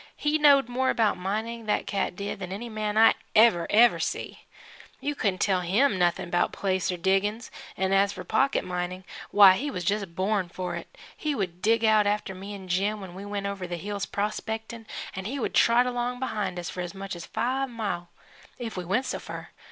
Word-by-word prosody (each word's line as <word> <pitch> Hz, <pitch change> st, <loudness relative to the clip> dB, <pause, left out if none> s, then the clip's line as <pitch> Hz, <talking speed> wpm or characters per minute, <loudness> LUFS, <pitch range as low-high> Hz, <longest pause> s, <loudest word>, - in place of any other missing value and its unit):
He 300 Hz, +1 st, +1 dB
knowed 280 Hz, -4 st, +6 dB
more 260 Hz, +2 st, 0 dB
about 220 Hz, -3 st, +2 dB
mining, 220 Hz, +5 st, -3 dB
that 210 Hz, -, +1 dB
cat 195 Hz, -2 st, -2 dB
did, 200 Hz, +1 st, -5 dB
than 185 Hz, -1 st, -6 dB
any 225 Hz, +5 st, -5 dB
man 215 Hz, -1 st, -2 dB
I 225 Hz, +1 st, +7 dB, 0.2 s
ever, 210 Hz, -7 st, +5 dB
ever 235 Hz, +3 st, +5 dB
see. -, -, -4 dB, 0.5 s
You 290 Hz, -, -2 dB
couldn't 200 Hz, -9 st, -1 dB
tell 190 Hz, -3 st, +2 dB
him 200 Hz, +5 st, +2 dB
noth'n' 175 Hz, 0 st, +1 dB
'bout 175 Hz, -, +2 dB
placer 185 Hz, -2 st, -1 dB
diggin's 195 Hz, +6 st, 0 dB, 0.3 s
'n' 190 Hz, 0 st, +1 dB
as 195 Hz, +1 st, +4 dB
for 180 Hz, -, -7 dB
pocket 270 Hz, +9 st, +1 dB
mining, 180 Hz, +1 st, -4 dB, 0.3 s
why 195 Hz, -2 st, +8 dB
he 290 Hz, +3 st, -2 dB
was 180 Hz, -10 st, -4 dB
just 195 Hz, -2 st, -1 dB
born 190 Hz, -1 st, 0 dB
for 180 Hz, 0 st, -4 dB
it. 170 Hz, -, -9 dB, 0.2 s
He 300 Hz, -2 st, -2 dB
would 180 Hz, -5 st, -3 dB
dig 225 Hz, +2 st, +3 dB
out 215 Hz, -1 st, +4 dB
after 205 Hz, -1 st, -1 dB
me 195 Hz, +2 st, -7 dB
an' 190 Hz, -2 st, -10 dB
Jim 200 Hz, +4 st, 0 dB
when 190 Hz, -3 st, -9 dB
we 195 Hz, +2 st, -8 dB
went 205 Hz, -1 st, -4 dB
over 200 Hz, -2 st, -4 dB
the 175 Hz, 0 st, -4 dB
hills 200 Hz, +3 st, -4 dB
prospect'n', 220 Hz, +2 st, -4 dB, 0.3 s
and 190 Hz, +1 st, -4 dB
he 270 Hz, +5 st, -3 dB
would 255 Hz, -, -2 dB
trot 235 Hz, +2 st, +5 dB
along 245 Hz, 0 st, -2 dB
behind 210 Hz, -8 st, -2 dB
us 175 Hz, -1 st, -4 dB
for 180 Hz, -, -5 dB
as 180 Hz, +2 st, -6 dB
much 195 Hz, -1 st, -5 dB
as 170 Hz, -, -8 dB
five 265 Hz, +2 st, -1 dB
mile, 200 Hz, -7 st, -4 dB, 0.5 s
if 230 Hz, -2 st, -5 dB
we 180 Hz, -, -3 dB
went 195 Hz, +10 st, 0 dB
so -, -, -3 dB
fur. -, -, -8 dB
200 Hz, 205 wpm, -27 LUFS, 185-230 Hz, 0.5 s, why